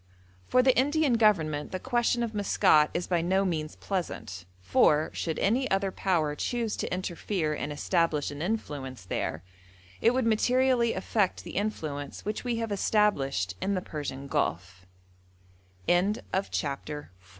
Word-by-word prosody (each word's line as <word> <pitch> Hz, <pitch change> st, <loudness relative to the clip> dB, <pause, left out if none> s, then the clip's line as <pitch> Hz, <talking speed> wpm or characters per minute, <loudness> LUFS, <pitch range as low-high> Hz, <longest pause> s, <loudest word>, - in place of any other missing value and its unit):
For 255 Hz, -, +4 dB
the 260 Hz, -1 st, +4 dB
Indian 290 Hz, +1 st, +3 dB
Government 165 Hz, -10 st, +2 dB
the 185 Hz, -, -3 dB
question 240 Hz, 0 st, +1 dB
of 230 Hz, -1 st, -3 dB
Maskat 155 Hz, -7 st, +4 dB
is 175 Hz, -, -2 dB
by 175 Hz, -2 st, +1 dB
no 190 Hz, +3 st, +2 dB
means 155 Hz, -4 st, -2 dB
pleasant, 110 Hz, -, -4 dB
for, 150 Hz, -, +3 dB
should 160 Hz, -2 st, -2 dB
any 250 Hz, +6 st, +1 dB
other 195 Hz, 0 st, +1 dB
Power 165 Hz, -6 st, 0 dB
choose 230 Hz, +7 st, -2 dB
to -, -, -3 dB
interfere 180 Hz, -2 st, -2 dB
and 150 Hz, 0 st, -4 dB
establish 155 Hz, -1 st, 0 dB
an 145 Hz, +1 st, -7 dB
influence 145 Hz, -, -4 dB
there, 80 Hz, -2 st, -3 dB, 0.6 s
it 235 Hz, +2 st, +4 dB
would 260 Hz, -2 st, +1 dB
materially 245 Hz, +1 st, +3 dB
affect 205 Hz, -5 st, 0 dB
the -, -, -9 dB
influence 155 Hz, -9 st, -3 dB
which 210 Hz, +1 st, -3 dB
we 245 Hz, -2 st, -1 dB
have 225 Hz, -1 st, -3 dB
established 140 Hz, -, +1 dB
in 200 Hz, +1 st, 0 dB
the -, -, +1 dB
Persian 145 Hz, -5 st, -6 dB
Gulf. 90 Hz, -7 st, -2 dB, 1.0 s
FOOTNOTES: 185 Hz, +4 st, +3 dB
[Footnote -, -, -10 dB
7: 190 Hz, -, -1 dB, 0.3 s
Pinkerton, 150 Hz, +1 st, -7 dB
vol. -, -, -19 dB
185 Hz, 155 wpm, -28 LUFS, 150-220 Hz, 1.0 s, For